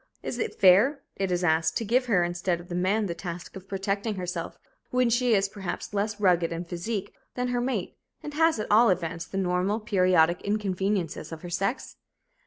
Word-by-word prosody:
Is 245 Hz, -, -4 dB
it -, -, -3 dB
fair, 205 Hz, +10 st, +5 dB
it 195 Hz, -1 st, -2 dB
is 180 Hz, 0 st, 0 dB
asked, 160 Hz, -1 st, +2 dB
to 230 Hz, -, -3 dB
give 250 Hz, +4 st, +2 dB
her, 190 Hz, -7 st, +3 dB
instead 175 Hz, 0 st, -1 dB
of 175 Hz, +1 st, -13 dB
the -, -, -5 dB
man, 190 Hz, +5 st, +1 dB
the 175 Hz, -, -2 dB
task 170 Hz, +1 st, -7 dB
of 190 Hz, 0 st, -10 dB
protecting 200 Hz, +2 st, -2 dB
herself 180 Hz, -2 st, -4 dB, 0.3 s
when 250 Hz, -1 st, +2 dB
she 240 Hz, -1 st, +3 dB
is, 195 Hz, 0 st, +2 dB
perhaps, 195 Hz, 0 st, -6 dB
less 210 Hz, +1 st, -1 dB
rugged 175 Hz, -4 st, +3 dB
in 170 Hz, +1 st, -4 dB
physique 190 Hz, +4 st, -4 dB, 0.2 s
than 250 Hz, 0 st, -1 dB
her 245 Hz, 0 st, 0 dB
mate, 240 Hz, -7 st, -2 dB, 0.3 s
and 295 Hz, -, -6 dB
has, 320 Hz, -3 st, +3 dB
at 215 Hz, -, -3 dB
all 225 Hz, +2 st, +6 dB
events, 170 Hz, -2 st, -1 dB
the 195 Hz, -, -6 dB
normal, 185 Hz, +3 st, 0 dB
periodic 185 Hz, -5 st, +3 dB
inconveniences 195 Hz, -5 st, -1 dB
of 160 Hz, -1 st, -8 dB
her 175 Hz, -, -7 dB
sex? 195 Hz, +8 st, -2 dB
195 Hz, 195 wpm, -27 LUFS, 175-220 Hz, 0.3 s, all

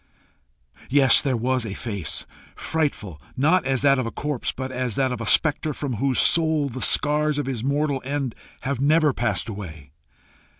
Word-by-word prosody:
Yes, 135 Hz, -2 st, +5 dB
there 130 Hz, -4 st, 0 dB
was 130 Hz, +1 st, 0 dB
a 105 Hz, -3 st, -5 dB
face! 100 Hz, -9 st, -2 dB, 0.3 s
frightful, 115 Hz, -, -3 dB, 0.2 s
not 150 Hz, +3 st, +2 dB
as 135 Hz, -1 st, 0 dB
that 140 Hz, -1 st, +4 dB
of 125 Hz, -, -2 dB
a -, -, -4 dB
corpse, 145 Hz, -4 st, -3 dB
but 130 Hz, 0 st, -6 dB
as 125 Hz, -4 st, -2 dB
that 130 Hz, -1 st, +1 dB
of 125 Hz, -, -4 dB
a 115 Hz, -, -4 dB
spectre 155 Hz, +5 st, +2 dB
from 135 Hz, -6 st, -4 dB
whose 135 Hz, +2 st, 0 dB
soul 160 Hz, -3 st, +2 dB
the 130 Hz, +1 st, -7 dB
scars 150 Hz, 0 st, +2 dB
of 145 Hz, -, -1 dB
his 130 Hz, -4 st, -4 dB
mortal 140 Hz, 0 st, 0 dB
end 135 Hz, -2 st, -3 dB, 0.3 s
have 135 Hz, -1 st, -3 dB
never 150 Hz, 0 st, +3 dB
passed 105 Hz, -7 st, -1 dB
away. 80 Hz, -, -8 dB
130 Hz, 175 wpm, -23 LUFS, 115-145 Hz, 0.3 s, Yes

